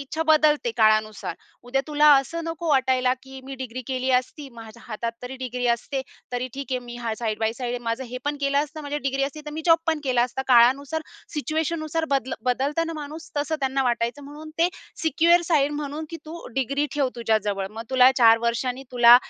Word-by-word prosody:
इच्छा 295 +4 -3
बदलते 305 -5 +4
काळानुसार. 215 -4 +2 0.3
उद्या 255 +3 0
तुला 300 0 +3
असं 275 +5 0
नको 330 0 -4
वाटायला 260 -2 +3
की 265 0 -11
मी 270 +1 -7
डिग्री 255 -1 -6
केली 260 0 -1
असती, 255 +3 -1
माझ्या 225 0 -12
हातात 230 +1 -3
तरी 250 +1 -6
डिग्री 250 -1 -3
असते, 245 +3 0 0.3
तरी 245 +1 -2
ठीक 275 0 -5
आहे 255 - +1
मी 240 - -7
हा 235 -2 -3
साइड 220 -3 -2
बाय 220 0 +1
साइड 245 0 -4
आहे 245 - -2
माझं, 230 +3 -1
हे 250 +1 -6
पण 290 0 -1
केलं 280 0 +2
असतं 305 +2 -3
माझी 290 0 -3
डिग्री 275 -1 -1
असती 285 +2 -5
तर - - -4
मी 315 +1 -5
जॉब 330 -1 +6
पण 320 -2 +1
केला 250 -3 +3
असता. 250 +2 -2
काळानुसार 265 +6 +4 0.3
सिच्युएशननुसार 315 +1 -1
बदल 265 -2 0 0.2
बदलत 280 +6 0
ना 330 - -4
माणूस 310 +2 -8
तसं 295 +2 0
त्यांना 270 0 +1
वाटायचं 240 +3 -1
म्हणून 300 +2 -10
ते 340 +2 +4 0.3
सिक्युअर 330 +3 +4
साइड 295 -4 +2
म्हणून 295 +1 -4
की 335 - -5
तू 335 +2 -8
डिग्री 275 +3 0
ठेव 280 -3 +1
तुझ्याजवळ. 210 -4 0
मग 220 +1 -7
तुला 260 0 +7
4 230 -1 +7
वर्षांनी 245 +2 -1
तुला 240 -1 +9
265 Hz, 200 wpm, -24 LUFS, 240-300 Hz, 0.3 s, तुला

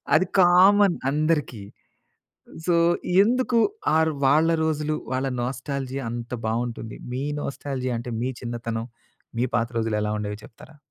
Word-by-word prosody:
అది 175 +3 +3
కామన్ 185 +2 +6 0.2
అందరికీ. 150 -7 0 1.1
సో, 175 - +3 0.5
ఎందుకు 245 +1 +1 0.4
ఆ - - +4
ర్ 160 - -1
వాళ్ళ 155 +4 +4 0.2
రోజులు 155 -1 -1 0.2
వాళ్ళ 130 +1 0 0.2
నోస్టాల్జియా 135 +1 -4
అంత 120 +1 -6 0.2
బాగుంటుంది, 115 -1 -3 0.2
మీ 130 +2 -2 0.2
నోస్టాల్జియా 130 -3 -3
అంటే 120 0 -6
మీ 130 - 0
చిన్నతనం, 115 -1 -4 0.5
మీ 125 - +2
పాత 115 -1 0
రోజులు 110 -1 0
ఎలా 105 0 -1
ఉండేవి 105 0 -4
చెప్తారా? 150 +7 -15
130 Hz, 130 wpm, -24 LUFS, 120-155 Hz, 1.1 s, కామన్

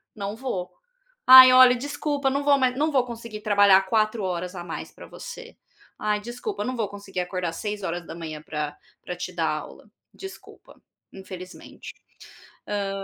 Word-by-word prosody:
não 200 0 -5
vou, 210 -8 -5 0.6
ai, 255 0 +11
olha, 255 -1 +7
desculpa, 285 +1 -2
não 280 +1 -1
vou 285 -1 +4
mais, 255 -1 +1
não 305 +2 +1
vou 260 -3 +3
conseguir 230 -3 -8
trabalhar 200 -2 +5
4 215 +1 0
horas 180 0 -3
a 175 -1 -7
mais - - -7
para - - -13
você. 485 -1 -10 0.4
Ai, 210 0 0
desculpa, 245 - -5
eu - - -3
não 255 0 -3
vou 215 -4 -2
conseguir 200 -2 -6
acordar 180 -1 -3
às 165 - -10
6h 170 -6 -5
pra 150 -1 -5 0.3
pra 180 - -6
te 180 0 -6
dar 165 -2 0
aula, 155 +7 -7 0.2
desculpa, 385 0 -13 0.3
infelizmente", 185 -1 -11 0.7
hã 200 -1 -2
205 Hz, 160 wpm, -24 LUFS, 180-255 Hz, 0.7 s, ai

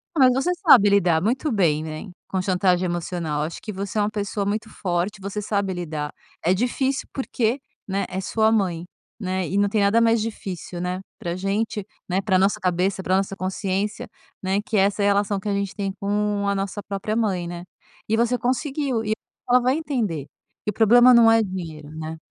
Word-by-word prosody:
Não, 265 -4 +6
mas 255 - +4
você 360 - +2
sabe 245 - +7
lidar 175 -5 +4
muito 260 +6 0
bem, 160 -7 +2
né, 155 +5 -6 0.2
com 190 - -2
chantagem 185 -1 +2
emocional. 170 -3 -2
Acho 160 +2 -4
que 215 - -6
você 200 +2 -4
é 210 - +4
uma 205 - +1
pessoa 205 -1 -2
muito 215 +2 -2
forte, 185 +1 -2
você 200 +2 -4
sabe 200 -2 -1
lidar. 155 -4 -4 0.3
É 180 - +4
difícil 260 +5 0
porque, 255 -1 -1 0.3
né, 195 +1 -1
é 190 +1 -3
sua 220 +3 +2
mãe, 180 -6 0 0.3
né, 185 -3 -2
e 195 - -1
não 205 0 +4
tem 210 0 +1
nada 200 +3 +4
mais 230 -1 +3
difícil, 185 -5 -5
né, 180 +1 -2 0.2
para 170 - -4
a - - -2
gente, 200 +2 -1 0.2
né, 190 +2 0
pra 190 -2 +2
nossa 195 +2 +2
cabeça, 185 +2 0
pra 185 +1 +2
nossa 195 0 -1
consciência, 190 +2 -2 0.3
né, 195 +2 0
que 215 0 -2
é - - +5
essa 200 +1 +1
relação 200 0 +2
que 205 +2 -4
a - - +1
gente 200 -1 -2
tem 195 -2 -2
com 205 0 0
a 200 - +2
nossa 200 +1 -3
própria 205 +2 -3
mãe, 195 -6 0
né, 175 0 -6 0.4
e 220 - +2
você 240 +2 +2
conseguiu 260 -1 -1
e 215 0 0 0.4
ela 250 +1 +6
vai 255 +2 +2
entender 220 - -2 0.4
que - - -2
o 210 - -1
problema 240 +4 +6
não 230 -1 +7
é 225 0 +5
dinheiro, 165 -7 -5
né. 160 +1 -6
200 Hz, 205 wpm, -23 LUFS, 185-220 Hz, 0.4 s, sabe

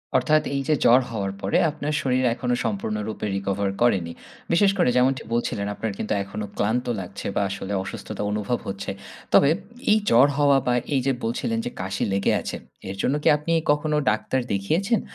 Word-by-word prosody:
অর্থাৎ 155 0 +4
এই 140 - 0
যে 155 - +3
জ্বর 125 +3 +7
হওয়ার 100 -3 -2
পরে 95 - +1
আপনার 150 0 -3
শরীর 130 -1 +1
এখনো 125 0 -1
সম্পূর্ণরূপে 105 0 -3
recover 100 0 -1
করেনি। 95 -8 +2 0.4
বিশেষ 195 +3 +5
করে 175 - +3
যেমনটি 130 +1 +2
বলছিলেন 105 -3 -1
আপনার 110 0 -3
কিন্তু 110 - -2
এখনো 105 +2 -5
ক্লান্ত 115 +5 0
লাগছে 95 +2 -6
বা - - +2
আসলে 100 0 -4
অসুস্থতা 95 - -6
অনুভব 105 +3 -1
হচ্ছে। 100 0 -4 0.4
তবে 140 - +6 0.4
এই 215 - +6
জ্বর 130 +5 +6
হওয়া 140 -1 +5
বা 125 - +3 0.2
এই 135 - +2
যে 135 - +3
বলছিলেন 115 0 -1
যে - - -1
কাশি 95 0 -2
লেগে 100 0 +2
আছে, - - -5 0.3
এর 95 - -4
জন্য 140 - +1
কি - - +1
আপনি 150 +3 -4 0.2
কখনো 150 +1 +1
ডাক্তার 130 +4 -1
দেখিয়েছেন? 175 - +1
115 Hz, 180 wpm, -24 LUFS, 100-140 Hz, 0.4 s, জ্বর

